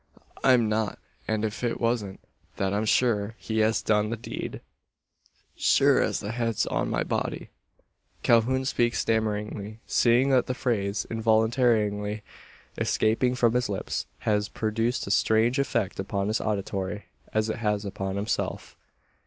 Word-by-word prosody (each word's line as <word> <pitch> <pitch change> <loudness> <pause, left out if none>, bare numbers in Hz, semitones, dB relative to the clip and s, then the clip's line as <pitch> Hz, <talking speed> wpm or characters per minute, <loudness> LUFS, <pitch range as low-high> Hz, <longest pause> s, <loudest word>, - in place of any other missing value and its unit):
I'm 125 -4 +5
not; 110 -1 -1 0.3
and 110 0 0
if 110 +2 -5
it 120 -1 -1
wasn't 115 -5 -1 0.4
that 95 0 0
I'm 105 +2 0
sure 110 -2 +2
he 110 -1 -3
has 110 +1 +2
done 105 0 +2
the 115 - -3
deed - - -6 0.9
sure - - +4
as - - 0
the 100 - -4
head's 115 -2 0
on - - -1
my - - 0
body - - -3 0.3
" - - -40
Calhoun 125 +3 +3
speaks 120 -2 +1
stammeringly, 105 -1 -1
seeing 125 +3 +3
that 130 -2 +3
the 130 - -2
phrase, 100 -5 -1
involuntarily 110 -2 +1 0.6
escaping 125 +3 +1
from 120 -2 +3
his 125 -1 +1
lips, 100 - -3
has 105 -1 0
produced 115 +3 -1
a 100 - -4
strange 110 +5 +3
effect 115 -9 -1
upon 100 +1 -2
his 110 - 0
auditory 100 -1 -3 0.3
as 110 0 +1
it 110 - -2
has 105 -2 -1
upon 95 -1 -4
himself. 100 +2 -3
110 Hz, 145 wpm, -27 LUFS, 105-115 Hz, 0.9 s, I'm